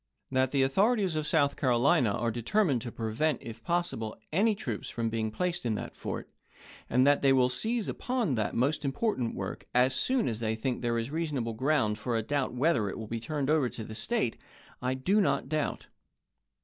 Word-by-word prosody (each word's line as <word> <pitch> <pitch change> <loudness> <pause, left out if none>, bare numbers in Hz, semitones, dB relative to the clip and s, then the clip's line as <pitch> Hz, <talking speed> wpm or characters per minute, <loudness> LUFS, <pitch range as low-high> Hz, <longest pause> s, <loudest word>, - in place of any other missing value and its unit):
That 130 0 +2
the 135 0 +2
authorities 195 - +2
of 155 -1 -1
South 140 -3 +2
Carolina 125 -3 +3
are 115 +2 0
determined 130 - +1
to 120 - -5
prevent, 115 +7 -1
if 115 0 -9
possible, 170 -11 -2 0.2
any 210 +5 +3
troops 115 - -5
from 115 -1 -2
being 110 -1 -1
placed 175 +10 -2
in 115 -3 0
that - - -5
fort, - - -5 0.6
and 125 +2 +4
that 145 0 +4
they 135 - +4
will 130 -1 +4
seize 220 - -1
upon 245 - -1
that 110 -3 -1
most 140 +5 +1
important 135 - -1
work, - - -5
as 125 +1 +5
soon 255 - +2
as 110 -2 -2
they 110 -1 -1
think 125 +3 -2
there 120 -1 0
is 115 +4 -3
reasonable 150 -8 -2
ground 110 -4 +1
for 120 -1 -1
a 110 - -1
doubt 140 +2 -1
whether 125 -4 +1
it - - -6
will 110 - -5
be 115 +2 -4
turned 145 +2 -2
over 150 -6 +3
to 115 - -7
the 110 - -8
State, 215 - 0 0.4
I 130 +1 0
do 190 +11 +2
not 140 -5 +1
doubt. 155 0 -2
130 Hz, 200 wpm, -29 LUFS, 115-155 Hz, 0.6 s, as